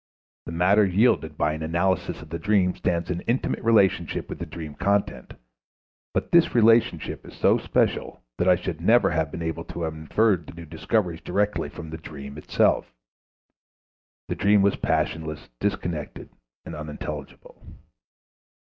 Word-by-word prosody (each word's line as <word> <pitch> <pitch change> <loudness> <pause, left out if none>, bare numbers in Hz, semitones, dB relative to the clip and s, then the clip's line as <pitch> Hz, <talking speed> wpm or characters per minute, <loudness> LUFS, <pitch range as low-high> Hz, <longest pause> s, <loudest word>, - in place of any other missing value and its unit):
The - - -5
matter 95 +5 +4
yielded 100 +6 +2
by 75 +1 +1
an 80 - -6
analysis 85 +1 -1
of 75 - -14
the 85 - -3
dream 100 -3 +2
stands 85 -1 -1
in 90 0 -3
intimate 120 +3 -1
relationship 100 -7 +2
with - - -6
the - - -5
dream 80 -3 -7
content, 100 +5 -1 0.8
but - - -2
this 170 -5 +4
relationship 115 0 +3
is - - -13
so - - +3
special - - -1 0.2
that 90 - +3
I 90 - +7
should 85 -2 -5
never 100 0 +4
have 80 -3 0
been 85 - -6
able 80 0 -3
to 85 - -6
have 80 -1 -2
inferred 85 +3 +1
the - - -10
new 85 0 -9
discoveries 90 +1 -1
directly 105 -6 -1
from 80 +1 -9
the 80 - -5
dream 70 -2 -9
itself. - - +1 1.4
The - - -2
dream 100 0 +3
was 100 - +3
passionless, 80 -2 -2
disconnected, 80 -4 -3 0.4
and - - -7
unintelligible. 75 -1 -8
85 Hz, 155 wpm, -25 LUFS, 80-100 Hz, 1.4 s, I